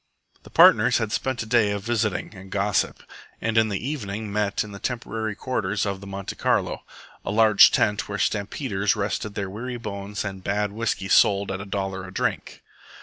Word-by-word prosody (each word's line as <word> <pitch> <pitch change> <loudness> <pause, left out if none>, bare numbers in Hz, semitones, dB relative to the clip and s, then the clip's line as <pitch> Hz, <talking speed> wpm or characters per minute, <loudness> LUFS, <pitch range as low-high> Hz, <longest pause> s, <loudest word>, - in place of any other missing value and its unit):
The - - -15
partners 120 +4 +6
had 110 -2 -2
spent 130 +1 -1
a - - -9
day 110 -2 +3
of 100 -1 -3
visiting 110 -3 -1
and 95 -1 -12
gossip, 100 0 0 0.4
and 115 0 -2
in 110 -1 +4
the 105 +4 -3
evening 105 -7 -4
met 105 -1 0
in 105 - -10
the 100 - -9
temporary 110 -3 -3
quarters 105 -5 -1
of 100 -1 -3
the 100 - -9
Monte 95 0 -6
Carlo - - 0 0.4
a - - -4
large 110 0 +7
tent 105 0 +1
were 100 - -3
stampeders 100 0 0
rested 105 0 -3
their 100 -1 -2
weary 120 +6 -5
bones 105 -2 -5
and 95 -2 -6
bad 105 +1 -1
whisky 105 -2 -2
sold 100 0 +4
at 95 0 -4
a - - -7
dollar 95 -1 -3
a - - -10
drink. - - -3
105 Hz, 190 wpm, -24 LUFS, 100-110 Hz, 0.4 s, large